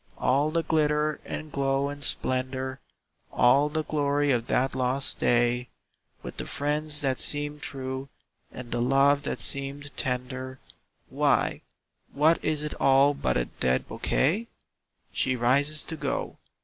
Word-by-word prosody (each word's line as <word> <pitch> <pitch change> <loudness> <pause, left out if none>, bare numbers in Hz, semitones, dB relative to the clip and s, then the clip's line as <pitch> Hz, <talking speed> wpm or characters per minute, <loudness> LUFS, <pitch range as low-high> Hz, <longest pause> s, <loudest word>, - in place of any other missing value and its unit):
All 140 +4 +2
the 165 +1 0
glitter 150 -1 +1
and 155 -1 -6
glow 135 0 0
and 145 0 -5
splendor, 130 0 -2 0.5
All 140 +4 +4
the 155 +1 -2
glory 145 -1 0
of 120 -2 0
that 130 +1 +1
lost 130 +1 +1
day, 120 +1 +2 0.5
With - - -8
the - - -5
friends 150 +1 +1
that 135 -2 0
seemed 145 0 0
true, 130 0 -5 0.4
and 125 -1 -9
the 120 - -1
love 135 +3 +3
that 140 - -4
seemed 140 +1 -1
tender, 130 +1 -3 0.5
Why, - - +1 0.5
what 155 +4 +3
is 150 -1 -1
it 150 - -3
all 135 +1 +5
but 140 - -1
a - - 0
dead 65 0 -1
bouquet? 195 - 0 0.6
She 130 - +1
rises 140 +5 +2
to 160 - -5
go. - - -4
140 Hz, 140 wpm, -27 LUFS, 130-150 Hz, 0.6 s, all